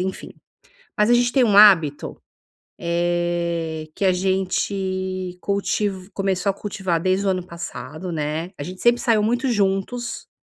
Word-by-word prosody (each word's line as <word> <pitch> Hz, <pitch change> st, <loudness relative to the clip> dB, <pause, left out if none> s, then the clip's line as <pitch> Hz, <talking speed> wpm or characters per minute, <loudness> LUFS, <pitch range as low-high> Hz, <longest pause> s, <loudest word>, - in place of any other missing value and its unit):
enfim. 190 Hz, +1 st, -4 dB, 0.6 s
Mas 210 Hz, +2 st, +3 dB
a 240 Hz, -, +6 dB
gente 245 Hz, 0 st, +2 dB
tem 265 Hz, -3 st, +4 dB
um 205 Hz, -4 st, +3 dB
hábito, 170 Hz, -9 st, +5 dB, 0.6 s
eh, 170 Hz, -2 st, -1 dB
que -, -, -2 dB
a 190 Hz, -, +4 dB
gente 185 Hz, 0 st, -2 dB
cultiv 200 Hz, -1 st, -2 dB
começou 195 Hz, -1 st, 0 dB
a -, -, 0 dB
cultivar 190 Hz, -4 st, -2 dB
desde 190 Hz, +2 st, +1 dB
o -, -, +3 dB
ano 185 Hz, -1 st, -1 dB
passado, 170 Hz, 0 st, -7 dB
né, 155 Hz, +2 st, -3 dB
a -, -, -6 dB
gente 185 Hz, +5 st, -8 dB
sempre 240 Hz, 0 st, +3 dB
saiu 225 Hz, -3 st, +2 dB
muito 245 Hz, +4 st, 0 dB
juntos, 205 Hz, +3 st, -1 dB
185 Hz, 150 wpm, -22 LUFS, 175-200 Hz, 0.6 s, a